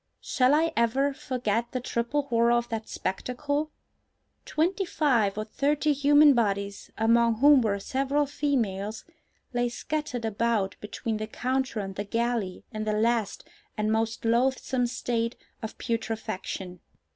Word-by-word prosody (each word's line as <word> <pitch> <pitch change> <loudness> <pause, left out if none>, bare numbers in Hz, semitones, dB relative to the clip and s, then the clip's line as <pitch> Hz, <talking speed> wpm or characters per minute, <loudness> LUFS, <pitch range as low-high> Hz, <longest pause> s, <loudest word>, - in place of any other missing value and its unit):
Shall 260 +2 +3
I 325 +1 +2
ever 260 +5 +2
forget 245 -5 -2
the 255 - 0
triple 245 +4 -1
horror 235 -3 +2
of 240 0 +1
that 220 -1 -4
spectacle? 285 +9 -2 0.8
Twenty 355 +6 0
five 245 - +1
or 215 - -2
thirty 290 +6 +1
human 290 +1 +6
bodies, 200 -4 -1
among 230 +1 +4
whom 280 +3 +6
were 210 -3 +1
several 275 +6 0
females, 225 -8 -2 0.5
lay 245 0 +1
scattered 250 -2 -3
about 220 -2 0
between 215 +1 -3
the 215 0 -4
counter 255 -1 -1
and 195 -1 -5
the 205 - -2
galley 230 -3 -2
in 215 -2 -4
the 215 - 0
last 225 -1 0 0.3
and 215 0 0
most 225 +1 -1
loathsome 250 +1 +1
state 235 -1 -2 0.3
of 220 -1 -6
putrefaction. 220 -5 -4
235 Hz, 135 wpm, -27 LUFS, 215-270 Hz, 0.8 s, human